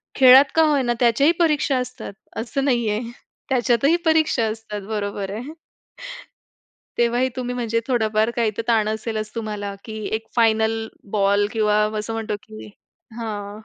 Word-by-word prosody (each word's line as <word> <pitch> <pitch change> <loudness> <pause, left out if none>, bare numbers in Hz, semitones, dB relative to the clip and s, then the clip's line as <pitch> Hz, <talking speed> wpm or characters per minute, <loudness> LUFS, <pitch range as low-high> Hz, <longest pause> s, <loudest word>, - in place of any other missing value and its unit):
खेळात 265 +1 +8
का 325 - +5
होय 295 -3 +2
ना, 240 -1 +1
त्याच्याही 250 +6 +4
परीक्षा 300 -5 +2
असतात. 250 -4 -5 0.3
असं 270 +4 -3
नाहीये. 235 -5 +1 0.5
त्याच्यातही 255 +4 +2
परीक्षा 315 -7 +3
असतात. 215 -2 -6
बरोबर 205 -2 -3
आहे. 250 +9 -6 1.4
तेव्हाही 240 +2 +2
तुम्ही 250 -1 -3
म्हणजे 230 -2 -1
थोडाफार 220 -3 +1
काही 230 -3 +1
तर - - 0
ताण 220 -2 +2
असेलच 215 0 -4
तुम्हाला, 210 -3 -4
की 220 -1 -7 0.2
एक 225 - -6
फायनल 225 -1 +2 0.2
बॉल 200 0 +2
किंवा 210 -1 +2 0.2
असं 215 +2 -5
म्हणतो, 225 -1 -3
की 215 -1 -11 0.5
हां. 210 -2 -5
225 Hz, 140 wpm, -22 LUFS, 215-250 Hz, 1.4 s, खेळात